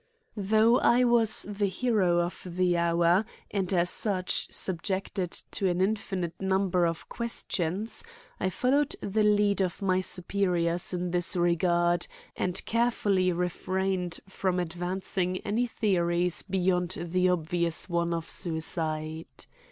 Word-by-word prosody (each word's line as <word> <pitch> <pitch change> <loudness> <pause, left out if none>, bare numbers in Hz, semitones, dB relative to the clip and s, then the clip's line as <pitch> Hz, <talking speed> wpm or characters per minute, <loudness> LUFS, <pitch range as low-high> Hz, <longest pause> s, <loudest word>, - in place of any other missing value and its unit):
Though 220 +4 +3
I 245 +1 +4
was 235 -3 +3
the 205 0 -1
hero 190 -5 +1
of 175 +1 -4
the 180 0 0
hour 170 +2 +3 0.3
and, 195 -3 -1
as 175 -1 +2
such, 190 -4 0
subjected 190 0 -1 0.2
to 195 - 0
an 175 0 -1
infinite 190 -3 -1
number 190 -2 +2
of 165 0 -4
questions, 210 - -3 0.4
I 185 - 0
followed 275 +8 +1
the 210 +2 0
lead 205 -1 +3
of 180 -2 -1
my 185 -2 +1
superiors 180 -2 0
in 180 -1 -2
this 175 +1 +1
regard 175 0 +2 0.3
and 180 -1 -1
carefully 210 -5 +1
refrained 180 +1 -2
from 185 -1 -1
advancing 180 +1 -2
any 235 +4 0
theories 175 -5 +1
beyond 180 -2 0
the 180 +2 +1
obvious 170 -1 0
one 170 -1 0
of 165 -1 -2
suicide. 160 -2 -3
185 Hz, 125 wpm, -28 LUFS, 175-200 Hz, 0.4 s, I